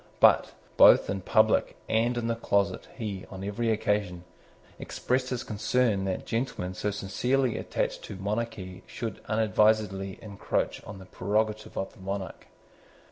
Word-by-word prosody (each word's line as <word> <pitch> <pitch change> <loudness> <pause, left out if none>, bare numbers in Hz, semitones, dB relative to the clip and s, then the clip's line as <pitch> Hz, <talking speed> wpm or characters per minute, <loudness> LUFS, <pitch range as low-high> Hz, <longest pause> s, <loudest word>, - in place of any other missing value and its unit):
But, - - +5 0.2
both - - +7
in 95 -1 -3
public - - +3
and 120 +2 +1
in 120 - -1
the 115 - +1
closet, 100 -3 0
he, 105 -6 -5
on 95 -1 -7
every 105 +4 -1
occasion, 105 -5 0 0.6
expressed 130 0 -1
his 125 -2 -2
concern 110 -1 +1
that 95 -1 -2
gentlemen 115 -6 -2
so 95 +3 -2
sincerely 115 +5 0
attached - - -2
to - - -7
monarchy 100 -2 -4
should 115 -4 -5
unadvisedly 105 -3 +2
encroach 100 -3 -2
on 100 0 -8
the 95 - -11
prerogative 110 +4 -1
of 95 - -3
the - - -19
monarch. 95 -1 -5
105 Hz, 140 wpm, -28 LUFS, 95-115 Hz, 0.6 s, both